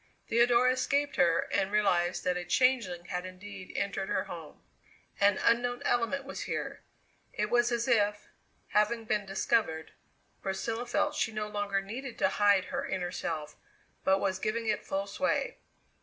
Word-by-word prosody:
Theodora 240 Hz, +2 st, +4 dB
escaped 280 Hz, +2 st, 0 dB
her, 170 Hz, -2 st, +4 dB
and 195 Hz, -1 st, +1 dB
realized 180 Hz, -4 st, +2 dB
that 180 Hz, 0 st, +1 dB
a 180 Hz, -, -2 dB
changeling 185 Hz, -3 st, +2 dB
had 180 Hz, +1 st, -3 dB
indeed 185 Hz, +1 st, -9 dB
entered 195 Hz, -1 st, -2 dB
her -, -, +1 dB
home. -, -, -10 dB, 0.6 s
An 200 Hz, 0 st, +4 dB
unknown 245 Hz, +1 st, +1 dB
element 245 Hz, +3 st, +1 dB
was 275 Hz, -, -5 dB
here. -, -, -3 dB, 0.5 s
It 210 Hz, +1 st, -1 dB
was 240 Hz, 0 st, +3 dB
as 235 Hz, 0 st, 0 dB
if, 210 Hz, -4 st, +2 dB, 0.4 s
having 220 Hz, +2 st, +2 dB
been 210 Hz, -2 st, 0 dB
discovered, 195 Hz, -5 st, 0 dB, 0.5 s
Priscilla 225 Hz, +5 st, -3 dB
felt -, -, +1 dB
she 225 Hz, -, 0 dB
no 215 Hz, -1 st, -3 dB
longer 205 Hz, -1 st, -1 dB
needed 240 Hz, +6 st, -7 dB
to -, -, +3 dB
hide 205 Hz, -2 st, +3 dB
her -, -, -1 dB
inner 180 Hz, -2 st, -2 dB
self, 155 Hz, -2 st, -4 dB, 0.5 s
but 190 Hz, 0 st, +4 dB
was 190 Hz, -1 st, -1 dB
giving 225 Hz, +3 st, -1 dB
it 215 Hz, -1 st, 0 dB
full 195 Hz, +1 st, -1 dB
sway. 280 Hz, -, -1 dB
205 Hz, 155 wpm, -30 LUFS, 190-235 Hz, 0.6 s, Theodora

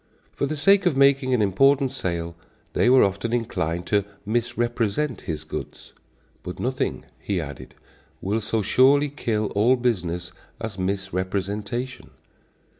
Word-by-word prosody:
For 140 Hz, -, -2 dB
the 155 Hz, +2 st, -3 dB
sake 195 Hz, +5 st, +4 dB
of 150 Hz, -6 st, +1 dB
making 135 Hz, -1 st, +4 dB
an 110 Hz, -, +2 dB
important 135 Hz, +7 st, +3 dB
sale 85 Hz, -8 st, -3 dB, 0.4 s
they -, -, +3 dB
were 130 Hz, 0 st, +7 dB
often 100 Hz, +3 st, -1 dB
inclined 90 Hz, -8 st, -1 dB
to 100 Hz, +2 st, +2 dB, 0.2 s
misrepresent 120 Hz, +3 st, -1 dB
his 80 Hz, -2 st, -3 dB
goods. 80 Hz, -, -7 dB, 0.5 s
"But -, -, -7 dB
nothing," -, -, -2 dB
he 100 Hz, -3 st, -2 dB
added, 70 Hz, -5 st, -8 dB, 0.4 s
"will 105 Hz, +4 st, -1 dB
so 110 Hz, 0 st, -1 dB
surely 135 Hz, +7 st, +4 dB
kill 110 Hz, -7 st, -2 dB
all 115 Hz, +6 st, +4 dB
business 90 Hz, -8 st, -1 dB, 0.3 s
as 110 Hz, -4 st, -6 dB
misrepresentation." 100 Hz, +5 st, -3 dB
110 Hz, 130 wpm, -24 LUFS, 95-130 Hz, 0.5 s, were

